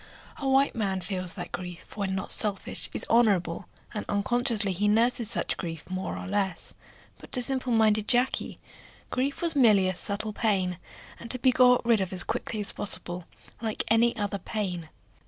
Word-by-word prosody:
A 275 - -2
white 270 +1 +3
man 195 -4 -1
feels 185 -1 -4
that - - -7
grief, 180 -1 -8
when 195 -2 -2
not 190 - -3
selfish, 205 -3 0
is - - +1
honorable, 200 -8 +2 0.3
and 210 - -3
unconsciously 215 0 +1
he 200 +3 0
nurses 230 +2 +2
such - - +1
grief 165 -3 -6
more 185 0 -3
or - - -6
less; 195 -3 -2 0.5
but - - -14
to 250 - +3
simple 260 0 +2
minded 215 -2 +3
Jacky 250 +1 +2 0.5
grief 275 +5 -2
was 335 -2 +1
merely 215 -8 +5
a 185 - 0
subtle 205 +3 -4
pain, 190 -5 0 0.4
and 235 - -9
to 255 - 0
be 255 +1 +3
got 250 -1 +4
rid 230 -3 +3
of 190 - -3
as 185 -2 0
quickly 220 - -3
as 205 - +3
possible, 175 -3 0 0.4
like 220 -2 -1
any 230 +2 +3
other 205 -2 -2
pain. 180 -5 -4
210 Hz, 175 wpm, -27 LUFS, 190-235 Hz, 0.5 s, merely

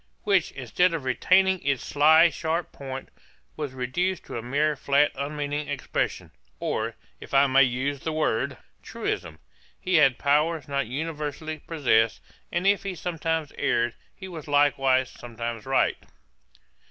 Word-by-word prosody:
Which, - - +2
instead 180 -1 +1
of 155 - -4
retaining 185 +8 +3
its 140 -3 -1
sly 160 +3 +5
sharp 165 +1 -2
point, 135 -1 -7 0.5
was 145 -4 -4
reduced 170 +9 -2
to - - -8
a - - -5
mere 145 +5 +1
flat 140 +1 +2
unmeaning 145 +1 -3
expression, 145 -2 -3 0.3
or, - - -2 0.2
if - - -6
I 135 +1 +7
may 135 0 +5
use 130 +2 +1
the 160 - -3
word, 155 -8 0 0.2
truism: - - -4 0.4
'He 185 -2 +2
had 135 -4 +5
powers 150 +2 +1
not 140 -3 -1
universally 155 +2 -4
possessed: 120 -9 +1 0.3
and 175 +2 -1
if 200 0 +4
he 195 -2 -4
sometimes 160 -2 -2
erred, 120 0 +1 0.2
he 190 - -9
was 165 -5 -8
likewise 135 -3 +3
sometimes 115 -1 -6
right.' 135 - +2
145 Hz, 140 wpm, -26 LUFS, 130-160 Hz, 0.5 s, I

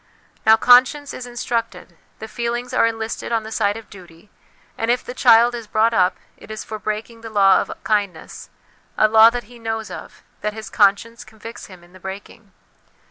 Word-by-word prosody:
Now, 220 0 +7
conscience 255 +5 +4
is 245 - -8
instructed, 240 -1 -4 0.2
the 220 - -8
feelings 240 +2 -4
are 240 - +3
enlisted 225 +1 -5
on 225 -1 0
the 220 - -9
side 205 -1 0
of 225 - -11
duty, 180 -1 -16 0.4
and 225 - -3
if 245 +1 +1
the 245 - -8
child 235 -1 +5
is 235 -2 -7
brought 220 +2 +2
up, 185 -4 +2 0.2
it - - -16
is 215 0 -6
for 215 -1 -7
breaking 215 +2 -5
the 225 - -8
law 195 -3 +4
of - - -6
kindness, 200 -6 -3 0.5
a 215 - +5
law 220 +1 +7
that 240 +1 -5
he 240 +2 -16
knows 225 -1 -4
of, - - -10 0.2
that 210 0 -2
his 220 0 -9
conscience 210 +3 +1
convicts 220 +2 -11
him 185 -3 -15
in 175 +1 -21
the 185 - -15
breaking. 195 +2 -10
220 Hz, 190 wpm, -20 LUFS, 210-235 Hz, 0.5 s, Now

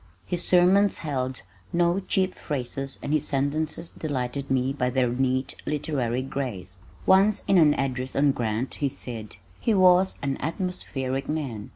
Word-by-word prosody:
His 175 -1 -3
sermons 185 +3 +4
held 130 -5 -2 0.3
no 175 +2 +2
cheap 190 -1 0
phrases 135 -1 -4
and 145 - -1
his 150 -1 +1
sentences 155 +4 0
delighted 140 -2 -3
me 130 0 +1
by 125 -3 0
their 125 -1 +1
neat 130 +1 0
literary 130 -5 -1
grace. 110 -9 -5 0.3
Once 195 +2 +4
in 195 -2 +4
an 150 -3 +5
address 130 -1 -2
on 140 0 +4
Grant 115 0 -2
he 140 - -1
said, 115 -5 -7 0.2
"He 225 - +1
was 185 0 +5
an 135 -1 -1
atmospheric 140 -5 -3
man. 135 -9 -3
140 Hz, 150 wpm, -26 LUFS, 130-170 Hz, 0.3 s, an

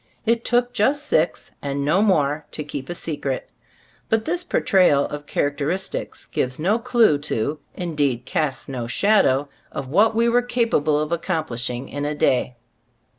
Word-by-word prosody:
It 230 +1 +2
took 245 0 +1
just 275 +7 +2
six, 165 - +1
and 140 0 -2
no 170 +7 +3
more, 150 -7 +1
to 155 - -3
keep 145 -2 -6
a 175 - -3
secret. 145 -6 -3 0.6
But 220 0 +1
this 350 +2 0
por - - 0
trayal 180 -7 +4
of 145 0 -6
characteristics 145 +6 -2
gives 130 0 -2
no 195 +9 +1
clue 235 - +3
to, 145 +1 -2 0.2
indeed 145 -8 -1
casts 135 -3 -2
no 125 -4 -4
shadow, 145 - +3 0.2
of 135 -2 -5
what 215 +9 +3
we 230 +1 +3
were 240 +1 +4
capable 230 -12 +1
of 155 +1 -2
accomplishing 135 -8 -2
in 145 0 -5
a 150 +1 -2
day. 125 -3 +1
155 Hz, 160 wpm, -22 LUFS, 140-220 Hz, 0.6 s, trayal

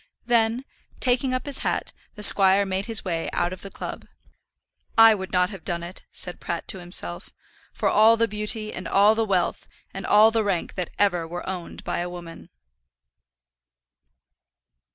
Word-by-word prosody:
Then, 235 +1 +1 0.3
taking 255 +1 +1
up 255 0 -3
his 285 -2 -2
hat, - - -2 0.2
the 210 - -2
squire 195 0 +6
made 190 +1 -3
his 225 -2 +2
way 165 -3 -2
out 175 - -1
of 185 - -10
the 195 - -8
club. - - -8 0.9
"I 225 0 +8
would 190 -2 -6
not 180 +1 +1
have 195 -5 -10
done 170 -1 -3
it," 175 +2 -9
said 180 - -4
Pratt 170 -1 -5
to 190 - -2
himself, 90 - -1 0.4
"for - - -2
all 220 +2 +5
the 230 0 +2
beauty, 215 +1 -2
and 175 -1 -7
all 200 +4 +4
the 225 0 0
wealth, 185 -4 -1 0.3
and - - -6
all 215 +2 +5
the 225 -1 0
rank 195 -4 -2
that 180 -2 -4
ever 180 -5 +1
were 175 +2 -7
owned 185 -2 -7
by - - -3
a 175 +1 -3
woman." 170 -2 -10
195 Hz, 175 wpm, -24 LUFS, 175-220 Hz, 0.9 s, I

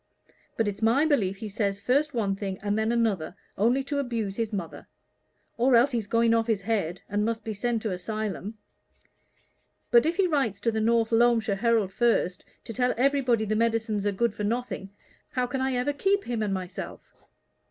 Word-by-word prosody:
But 225 - +1
it's 205 +1 -4
my 235 +7 +4
belief 205 -11 +1
he 215 - -6
says 200 -1 -1
first 275 +8 +1
one 200 -4 0
thing 195 -1 -4
and 205 0 0
then 220 +1 +1
another 210 -8 0 0.2
only 240 +6 +2
to 285 +1 -2
abuse 230 -7 -2
his 230 -1 -2
mother. 185 -6 -6 0.7
Or 245 +1 +4
else 245 +4 +5
he's 230 -4 -2
going 230 +1 +3
off 230 0 +2
his 220 -4 +1
head, 195 -5 -1
and 205 +1 0
must 225 +1 -2
be 220 - -4
sent 230 +2 -1
to 215 - -1
a 180 - -3
'sylum. 215 +1 -4 1.3
But 240 +5 +6
if 335 +2 -1
he 390 - +4
writes 270 - 0
to 230 - +1
the 220 0 -1
North 230 0 +2
Loamshire 225 -3 +3
Herald 220 -3 +1
first, 210 -6 +1 0.2
to 230 - -7
tell 250 +2 +1
everybody 255 -4 +2
the 215 +1 -1
medicines 225 -2 0
are - - +2
good 230 +2 0
for 210 - -5
nothing, 230 -2 -2 0.4
how 250 -1 +1
can 260 +2 -3
I 265 -1 0
ever 250 +4 0
keep 395 +7 +1
him 235 -2 -3
and 210 -2 -1
myself?" 185 -1 -6
225 Hz, 195 wpm, -27 LUFS, 205-245 Hz, 1.3 s, But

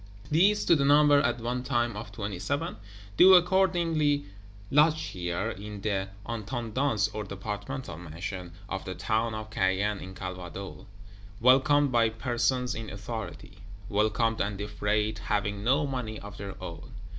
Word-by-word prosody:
These, 195 +7 +4
to 170 - +6
the 140 - +2
number 145 0 +6
at 140 - 0
one 120 +2 -2
time 120 -4 0
of 105 0 -7
Twenty 100 -3 -5
seven, 145 - -2 0.4
do 190 +1 +9
accordingly 170 -5 +3 0.5
lodge 155 +2 +5
here, 90 - -3
in 105 +1 -8
the 100 -2 -1 0.2
"Intendance," 115 +1 -1
or 105 - -3
Departmental 105 - -5
Mansion, 90 +2 -6 0.2
of 95 0 -4
the 95 - -5
town 110 +4 0
of 110 0 -7
Caen 100 +1 +1
in 95 +1 -9
Calvados; 90 0 -7 0.5
welcomed 135 +3 +5
by 115 -2 +4
Persons 120 +3 0
in 110 -1 -6
Authority; 100 -1 -7 0.3
welcomed 110 +2 +1
and 100 0 -1
defrayed, 105 +1 -1
having 100 -1 -1
no 135 +6 +3
money 125 -6 -4
of 100 0 -10
their 100 -1 -7
own. 85 -3 -8
110 Hz, 145 wpm, -28 LUFS, 100-135 Hz, 0.5 s, do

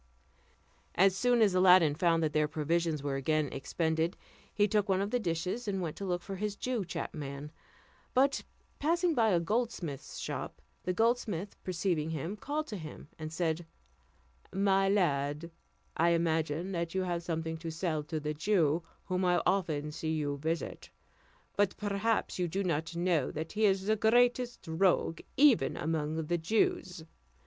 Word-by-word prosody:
As 190 +1 +5
soon 245 +2 +3
as 200 -3 +3
Aladdin 185 -4 +6
found 165 +1 +2
that 155 -1 0
their 150 -1 +3
provisions 160 0 -1
were 140 -1 -1
again 155 +1 +1
expended, 160 +4 -1 0.3
he 205 0 +2
took 210 0 +1
one 190 -1 +3
of 200 +2 -1
the 245 - +1
dishes, 180 +4 -2
and 195 -2 -1
went 165 -4 -3
to 200 - -4
look 175 -2 -1
for 195 -1 -6
his 210 +1 -2
Jew 245 0 -2
chapman; 145 -4 -5 0.6
but 275 +2 +3 0.4
passing 340 +3 +2
by 230 -5 +3
a 180 -4 +3
goldsmith's 190 - -2
shop, - - -5 0.3
the 180 - +1
goldsmith 210 -3 0
perceiving 170 -3 -1
him, 160 +5 -3
called 295 +8 -3
to 210 - -4
him, 155 -3 -9
and 155 0 -5
said, 165 0 -1 0.9
"My 195 0 +3
lad, 150 -4 0 0.4
I 170 +1 +3
imagine 165 +1 0
that 170 -1 -3
you 190 - +1
have 175 -2 -2
something 160 -1 -3
to 165 0 -6
sell 160 -1 -1
to 155 0 -3
the 150 0 -3
Jew, 165 -1 +2 0.2
whom 185 -1 -1
I 180 -1 +3
often 155 -6 0
see 160 +1 -3
you 145 -2 -1
visit; 160 +3 -3 0.7
but 205 -2 +1
perhaps 205 0 -1
you 180 - +1
do 195 +4 -2
not 165 -1 -1
know 170 -5 +1
that 160 +1 -5
he 215 +1 +2
is 190 -1 +1
the 215 +1 +3
greatest 245 +2 +2
rogue 165 0 +1 0.2
even 275 -4 +5
among 160 0 -1
the 175 +2 0
Jews. 180 -1 0
175 Hz, 165 wpm, -31 LUFS, 160-200 Hz, 0.9 s, Aladdin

